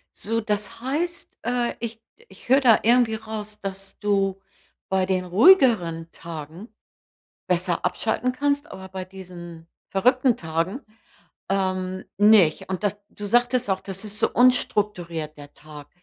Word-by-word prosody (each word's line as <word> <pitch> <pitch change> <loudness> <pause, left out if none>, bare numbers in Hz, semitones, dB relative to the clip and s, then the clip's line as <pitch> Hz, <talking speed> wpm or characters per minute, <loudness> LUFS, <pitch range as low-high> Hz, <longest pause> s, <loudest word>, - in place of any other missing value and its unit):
So, 225 +2 -2
das 210 0 -3
heißt, 320 +7 -3
äh, 245 0 0
ich 230 -1 -5 0.3
ich - - -17
höre 270 +2 +6
da 235 -5 +6
irgendwie 235 -1 +4
raus, 215 -1 -7
dass 195 0 -7
du 195 -2 0 0.5
bei 190 -1 +1
den 185 -1 0
ruhigeren 185 - +4
Tagen 165 +5 -9 0.8
besser 180 -1 0
abschalten 250 +3 0
kannst, 285 +2 -1
aber 190 0 -9
bei 190 0 -6
diesen 175 -3 -11 0.2
verrückten 250 +5 +3
Tagen, 165 - -2 0.7
ähm, 185 -1 -1
nicht. 205 -5 +5
Und 190 +2 -3
dass 205 0 -2
du 205 - -7
sagtest 245 +1 +2
auch, 190 - 0
das 195 +1 -6
ist 210 0 -4
so - - +2
unstrukturiert, 185 -10 +1
der 145 0 -12
Tag. 150 -1 -13
200 Hz, 140 wpm, -24 LUFS, 180-235 Hz, 0.8 s, höre